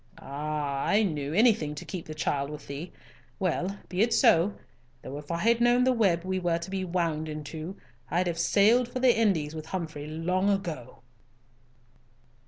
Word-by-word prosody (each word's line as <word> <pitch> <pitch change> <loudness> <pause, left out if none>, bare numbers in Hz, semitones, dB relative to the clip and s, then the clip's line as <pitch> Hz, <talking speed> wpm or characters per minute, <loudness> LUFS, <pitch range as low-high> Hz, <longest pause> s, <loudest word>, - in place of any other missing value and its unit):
Ah! 145 -1 -3
I 210 +2 +3
knew, 150 -7 -2
anything 200 -6 +3
to - - -8
keep 185 -4 -6
the 155 - -7
child 140 -2 -1
with 150 -1 -8
thee! 145 +5 -7 0.5
Well, 185 +2 -1
be 185 +1 -1
it 225 0 +3
so—though 140 - 0
if 150 - -13
I 170 - -1
had 230 +6 +2
known 240 +1 +4
the 260 - +4
web 195 -9 +2
we 185 0 -1
were 175 -2 +1
to 170 +2 -7
be 190 -1 -2
wound 165 -3 -1
into, 155 +4 -6 0.3
I'd 180 +2 +1
have 170 -2 -2
sailed 220 +8 +4
for 250 +1 -5
the 250 -2 +5
Indies 180 -10 +1
with 155 0 -7
Humfrey 155 -5 -5
long 180 +5 0
ago!" 165 -13 -3
170 Hz, 175 wpm, -28 LUFS, 150-200 Hz, 0.5 s, the